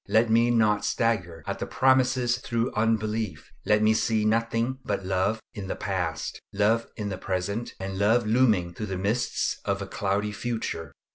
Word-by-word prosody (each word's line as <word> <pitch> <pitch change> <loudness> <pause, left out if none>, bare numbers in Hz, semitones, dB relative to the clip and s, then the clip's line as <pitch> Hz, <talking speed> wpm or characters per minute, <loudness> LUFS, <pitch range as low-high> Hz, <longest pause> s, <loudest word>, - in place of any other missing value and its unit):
Let 110 +1 +3
me 115 +1 +4
not 110 -3 +3
stagger 90 -9 0
at - - -4
the - - -3
promises 130 -2 +3
through 120 -1 -1
unbelief. 110 -6 -1 0.2
Let 105 0 +4
me 110 0 +5
see 110 -1 +1
nothing 115 +3 +1
but 100 -2 -2
love 95 +4 +1
in 100 -2 -6
the - - -3
past, 90 -5 -3
love 105 +3 +2
in 105 -2 -3
the 95 -2 -5
present, 100 +5 -3
and 95 0 -4
love 110 +3 +3
looming 105 -7 +3
through 105 +4 -5
the 95 -1 -3
mists 105 +6 -1
of 100 -1 -1
a 100 - -4
cloudy 100 +1 -1
future. 110 -9 -4
110 Hz, 170 wpm, -26 LUFS, 95-115 Hz, 0.2 s, me